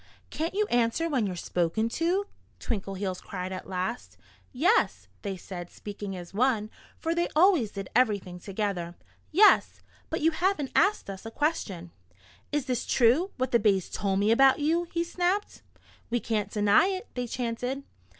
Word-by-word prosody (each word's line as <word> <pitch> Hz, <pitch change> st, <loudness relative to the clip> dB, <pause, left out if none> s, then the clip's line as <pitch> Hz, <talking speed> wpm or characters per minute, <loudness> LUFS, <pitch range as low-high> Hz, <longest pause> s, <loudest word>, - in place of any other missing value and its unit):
"Can't 330 Hz, +4 st, -3 dB
you 420 Hz, +1 st, +2 dB
answer 240 Hz, +7 st, +2 dB
when 260 Hz, -9 st, +1 dB
you're 185 Hz, -, -4 dB
spoken 175 Hz, +5 st, 0 dB
to?" 350 Hz, +9 st, 0 dB, 0.3 s
Twinkleheels 195 Hz, -3 st, -3 dB
cried 185 Hz, -1 st, -5 dB
at 185 Hz, 0 st, -6 dB
last. 185 Hz, +5 st, -4 dB, 0.3 s
"Yes!" 350 Hz, -, +2 dB
they 195 Hz, -2 st, -4 dB
said, 175 Hz, -1 st, -8 dB
speaking 205 Hz, -1 st, -7 dB
as 175 Hz, 0 st, -10 dB
one 220 Hz, -1 st, +1 dB, 0.3 s
for 330 Hz, 0 st, -1 dB
they 345 Hz, +1 st, +1 dB
always 325 Hz, -, +5 dB
did 195 Hz, -2 st, -6 dB
everything 205 Hz, -7 st, +1 dB
together. 190 Hz, -3 st, -3 dB, 0.4 s
"Yes! 415 Hz, +6 st, +5 dB, 0.3 s
But 320 Hz, -, -2 dB
you 325 Hz, +2 st, +4 dB
haven't 345 Hz, -5 st, 0 dB
asked 410 Hz, +5 st, +3 dB
us 195 Hz, -1 st, -7 dB
a 225 Hz, -, -6 dB
question." 215 Hz, -, -2 dB, 0.6 s
"Is 295 Hz, -3 st, 0 dB
this 250 Hz, -3 st, -2 dB
true 260 Hz, +10 st, +4 dB
what 255 Hz, 0 st, -1 dB
the 235 Hz, -, +4 dB
bays 200 Hz, -4 st, +2 dB
told 195 Hz, 0 st, -1 dB
me 205 Hz, +2 st, +3 dB
about 270 Hz, +3 st, +6 dB
you?" 325 Hz, +4 st, +1 dB
he 335 Hz, 0 st, 0 dB
snapped. 360 Hz, +4 st, -1 dB, 0.5 s
"We 240 Hz, +1 st, +1 dB
can't 220 Hz, -3 st, -1 dB
deny 210 Hz, -, +4 dB
it," 385 Hz, +3 st, -3 dB
they 250 Hz, -1 st, -3 dB
chanted. 245 Hz, +3 st, -3 dB
235 Hz, 160 wpm, -28 LUFS, 195-320 Hz, 0.6 s, about